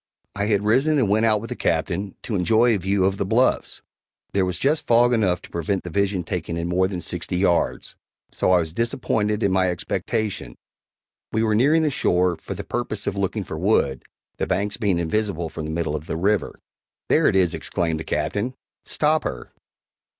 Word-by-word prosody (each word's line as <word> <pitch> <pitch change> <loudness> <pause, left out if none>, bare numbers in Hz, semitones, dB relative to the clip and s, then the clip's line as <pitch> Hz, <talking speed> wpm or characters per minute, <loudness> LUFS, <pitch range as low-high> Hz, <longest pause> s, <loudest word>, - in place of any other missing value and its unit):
I 100 - -1
had 105 -2 +1
risen 135 +8 +3
and 130 -6 +2
went 110 +3 +3
out 105 -2 +2
with 115 - -8
the - - -2
Captain, 90 +4 -1
to 115 - -5
enjoy 110 +6 +3
a 105 - 0
view 95 +1 +1
of 95 0 +1
the - - 0
bluffs. 115 +7 +1 0.5
There 95 -1 +2
was 90 -2 -1
just 150 - +1
fog 120 +1 +5
enough 95 -6 +1
to - - -13
prevent 85 +3 -2
the 90 - -7
vision 100 0 0
taking 85 -1 -4
in 85 0 -2
more 90 +2 +2
than 95 -2 -5
sixty 90 +1 -2
yards 90 -2 +1 0.4
so - - +1
I 90 - +6
was 80 -2 0
disappointed 110 -1 0
in 100 - +2
my 95 -1 +2
expectation. 90 - -3 0.8
We 110 - +1
were 110 -1 +2
nearing 145 +9 +4
the 150 - +1
shore, 90 -7 +2
for - - -7
the - - -6
purpose 110 -3 -3
of - - -1
looking 100 +1 -1
for 80 -3 -6
wood, 75 - +1 0.4
the - - -2
banks 100 +3 -1
being 100 -7 0
invisible 85 -1 -1
from 80 -1 -6
the - - -5
middle 80 -2 -1
of 75 +1 -6
the - - -3
river. 100 +3 0 0.5
"There - - +4
it - - +2
is!" 90 -3 +3
exclaimed 80 -2 -2
the - - -4
Captain; 120 +10 -2 0.3
"stop 155 +1 +1
her!" - - -5
100 Hz, 200 wpm, -23 LUFS, 90-110 Hz, 0.8 s, I